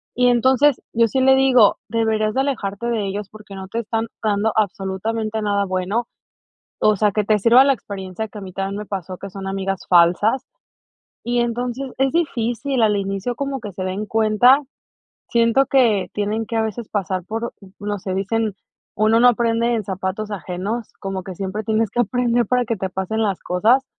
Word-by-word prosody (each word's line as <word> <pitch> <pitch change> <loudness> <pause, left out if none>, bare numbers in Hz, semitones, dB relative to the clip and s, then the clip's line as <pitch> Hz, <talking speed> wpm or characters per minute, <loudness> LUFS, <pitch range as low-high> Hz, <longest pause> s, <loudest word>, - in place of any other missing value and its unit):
Y 250 0 +3
entonces, 260 +3 +3
yo 230 0 +4
sí 260 +4 0
le 265 0 +6
digo: 260 -5 +5
"Deberías 220 -2 +1
de 265 - +1
alejarte 235 -5 -2
de 225 -4 -1
ellos 200 +1 -4
porque 210 -2 -12
no 190 0 -7
te 230 - -2
están 225 0 -2 0.2
dando 215 0 +1
absolutamente 215 +2 -1
nada 205 -1 +1
bueno, 190 +5 -1 0.7
o 215 0 +4
sea, 210 +1 +2
que 210 +1 0
te 215 +1 +3
sirva 235 +6 +6
la 275 - +4
experiencia 200 -1 -6
que 210 - -10
a - - -8
mí 190 -1 -8
también 195 +1 -3
me - - -5
pasó, 190 -2 -5
que 195 - -8
son 195 +1 -7
amigas 195 -1 -3
falsas". 180 +9 +4 0.8
Y 240 +1 0
entonces, 245 +2 -2
es 270 0 +2
difícil, 255 -5 0
al 210 -2 +3
inicio 195 +4 -3
como 275 0 -3
que 210 -3 -7
se 185 +1 -5
den 190 +3 -3
cuenta, 225 +4 +4 0.7
siento 235 +3 +3
que 240 -8 +3
tienen 210 +2 -1
que 230 - -3
a 225 - +2
veces 220 +1 -4
pasar 185 -2 -2
por, 225 +4 -4 0.3
no 205 0 -3
sé, 185 0 -4
dicen: 210 +2 -1 0.4
"Uno 220 +2 +3
no 245 - +7
aprende 235 0 +2
en 220 -2 -2
zapatos 190 +2 -4
ajenos", 200 +4 -4
como 195 -1 -4
que 185 - -7
siempre 195 +4 -4
tienes 220 -1 +1
que 240 - 0
aprender 240 +1 +1
para 250 -1 +1
que 230 - -1
te 190 - -2
pasen 190 +4 -2
las 200 -4 0
cosas, 225 +9 +2
215 Hz, 190 wpm, -21 LUFS, 195-235 Hz, 0.8 s, no